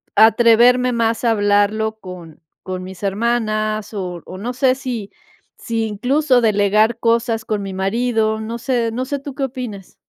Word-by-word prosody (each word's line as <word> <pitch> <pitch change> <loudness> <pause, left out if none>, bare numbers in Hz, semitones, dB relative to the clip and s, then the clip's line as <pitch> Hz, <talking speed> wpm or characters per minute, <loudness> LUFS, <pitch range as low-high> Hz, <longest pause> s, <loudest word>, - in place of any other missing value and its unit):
atreverme 240 +3 +5
más 230 -1 0
a 235 - +3
hablarlo 210 +1 +1
con 180 -5 -11 0.2
con 185 -1 -5
mis 185 0 -10
hermanas, 215 0 -1
o 180 -3 -5
o - - -9
no 235 +6 -4
sé, 255 0 +2
si 245 -6 -5 0.5
si 225 -2 -2
incluso 255 +5 +1
delegar 215 +1 +2
cosas 230 -1 0
con 210 -2 -2
mi 195 -1 -5
marido, 220 +3 0
no 225 +2 -5
sé 235 -1 -1
no 250 +3 -3
sé, 280 +2 -3
tú 280 0 -8
qué 280 - -3
opines. 240 -7 -7
225 Hz, 160 wpm, -19 LUFS, 205-245 Hz, 0.5 s, atreverme